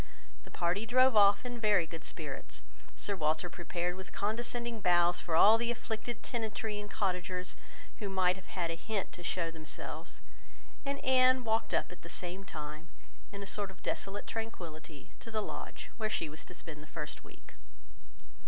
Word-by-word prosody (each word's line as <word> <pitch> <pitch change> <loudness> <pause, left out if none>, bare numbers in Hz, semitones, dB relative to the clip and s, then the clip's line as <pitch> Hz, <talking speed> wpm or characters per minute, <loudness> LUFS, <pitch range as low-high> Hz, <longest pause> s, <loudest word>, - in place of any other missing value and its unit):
The - - -11
party 180 +6 0
drove 255 +1 +6
off 200 +2 +7
in 245 -1 -4
very 210 -6 +5
good 165 0 -7
spirits; - - -5 0.3
Sir 200 - +1
Walter 160 +1 +1
prepared 175 0 -2
with 190 0 -8
condescending 235 +2 -1
bows 175 -1 +5
for 165 - -1
all 215 +7 +8
the 235 0 +1
afflicted 235 0 -3
tenantry 220 -2 -2
and 205 - -8
cottagers 180 -2 -1 0.4
who 205 - -2
might 185 -1 +3
have 190 - -12
had 170 -3 -1
a - - -1
hint 200 +3 -2
to 180 - -8
show 175 -1 0
themselves, 160 -1 -6 0.7
and 280 0 0
Anne 255 0 +6
walked 225 0 +1
up - - +1
at 180 - -11
the 170 - -9
same 180 +3 -3
time, 155 -2 -7 0.4
in 200 0 -6
a - - -5
sort 200 0 -2
of 190 - -14
desolate 200 +1 -2
tranquillity, 165 -9 -6
to - - -9
the 220 -1 0
Lodge, 210 - -5
where 215 -2 0
she 160 - 0
was 155 +1 -6
to 180 - -11
spend 155 -3 -7
the 155 - -11
first 150 0 -5
week. - - -15
190 Hz, 180 wpm, -34 LUFS, 175-220 Hz, 0.7 s, all